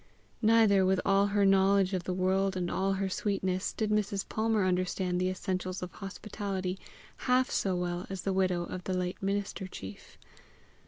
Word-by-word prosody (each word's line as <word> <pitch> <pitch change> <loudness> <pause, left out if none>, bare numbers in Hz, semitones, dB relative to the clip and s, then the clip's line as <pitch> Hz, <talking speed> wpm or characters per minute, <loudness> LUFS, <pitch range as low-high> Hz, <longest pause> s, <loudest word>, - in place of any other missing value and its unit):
Neither, 220 -3 +5
with 185 0 +2
all 195 0 +4
her 200 0 +2
knowledge 195 0 +4
of 180 -2 -2
the 185 - -1
world 190 +1 +1
and 175 -1 -2
all 195 +1 +1
her 195 0 -1
sweetness, 190 -1 -1
did 215 -1 -2
Mrs. 205 -2 0
Palmer 220 -2 +1
understand 180 0 0
the 185 - +1
essentials 185 0 -3
of 180 - -6
hospitality 195 -1 -5 0.5
half 255 0 +3
so 190 -2 0
well 175 0 -3
as 190 -2 -5
the 195 - 0
widow 185 -2 +1
of 180 +1 -7
the 185 -1 -1
late 180 0 -3
minister 195 -1 -2
chief. 100 - -10
190 Hz, 170 wpm, -30 LUFS, 185-200 Hz, 0.5 s, Neither